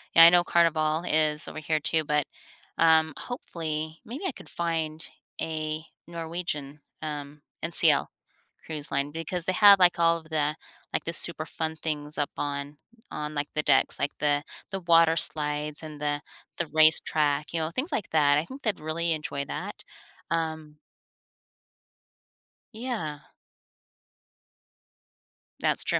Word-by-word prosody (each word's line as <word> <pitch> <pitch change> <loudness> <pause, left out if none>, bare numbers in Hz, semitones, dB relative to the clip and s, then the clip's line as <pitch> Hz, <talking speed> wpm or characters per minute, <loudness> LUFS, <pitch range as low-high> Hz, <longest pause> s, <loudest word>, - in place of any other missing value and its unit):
yeah, 165 - +10
I 170 - +11
know 175 0 +5
Carnival 160 -2 +2
is 155 -1 +1
over - - -7
here 155 0 -1
too, 160 +1 0
but, 150 -1 0 0.5
um, 160 -2 +4
hopefully 160 -9 -5
maybe 270 - -7
I - - -1
could - - -14
find 160 -2 -3 0.3
a 155 -1 -3 0.2
Norwegian, 165 -4 -5 0.2
um, 150 -1 -6 0.2
NCL - - +3 0.6
cruise 150 -2 -5
line 140 +1 -1
because 165 +2 -4
they 185 - 0
have, 200 +1 +8
like, 180 -1 +5
all 170 0 +3
of 160 - -13
the 150 -1 0 0.4
like, - - 0
the 165 - -2
super 165 -2 +4
fun 160 0 -4
things 150 -1 -4
up 145 - -1
on 145 0 -4 0.3
on, 150 0 -5
like, 145 -1 -2
the 150 - 0
decks, - - +3
like 140 - 0
the 145 -1 +1 0.3
the 195 -1 -4
water 165 -1 +5
slides 150 -1 +2
and 155 -2 -8
the 145 0 -1 0.4
the 170 - -2
racetrack, 155 -1 +4
you 165 - -1
know, 160 0 -2
things 265 - -3
like 205 - -2
that. 145 -2 +4
I 155 - 0
think 265 +6 -10
they'd 215 -5 -1
really 165 +2 -1
enjoy 145 -2 -4
that, - - -7 0.5
um 160 -2 -3 2.0
Yeah. 220 - -4 2.4
That's - - +4
true. - - 0
155 Hz, 145 wpm, -27 LUFS, 150-165 Hz, 2.4 s, I